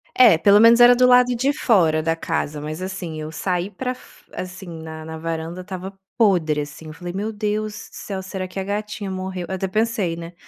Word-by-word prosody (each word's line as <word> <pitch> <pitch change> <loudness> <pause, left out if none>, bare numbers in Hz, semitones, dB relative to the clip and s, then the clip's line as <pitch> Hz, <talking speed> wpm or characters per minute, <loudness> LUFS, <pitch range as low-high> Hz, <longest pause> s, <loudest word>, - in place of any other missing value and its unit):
É, 235 -10 +7
pelo 200 +5 +5
menos 230 +1 +7
era 245 0 +9
do 250 +1 +4
lado 250 0 +5
de 265 +4 +1
fora 165 - +3
da 165 0 +1
casa. 155 -2 -3
Mas, 155 +4 -5
assim, 185 -4 -5
eu 155 +1 -6
saí 180 +3 -2
para 255 +3 -4
fo 255 - -19
assim, 185 0 -7
na 160 0 -8
na 160 - -6
varanda 165 +2 -4
estava 190 +1 -8 0.2
podre, 170 -9 +3
assim, 150 +2 -8
eu 155 - -8
falei: 175 +2 -7
"Meu 210 +3 -3
Deus 210 0 -2 0.2
do - - -21
céu, 195 -2 -5
será 185 0 -5
que 195 - -6
a 190 - -3
gatinha 205 0 -4
morreu?" 185 -1 -4
Até 190 0 -2
pensei, 215 -4 0
né, 170 +1 -8
185 Hz, 210 wpm, -22 LUFS, 165-210 Hz, 0.2 s, era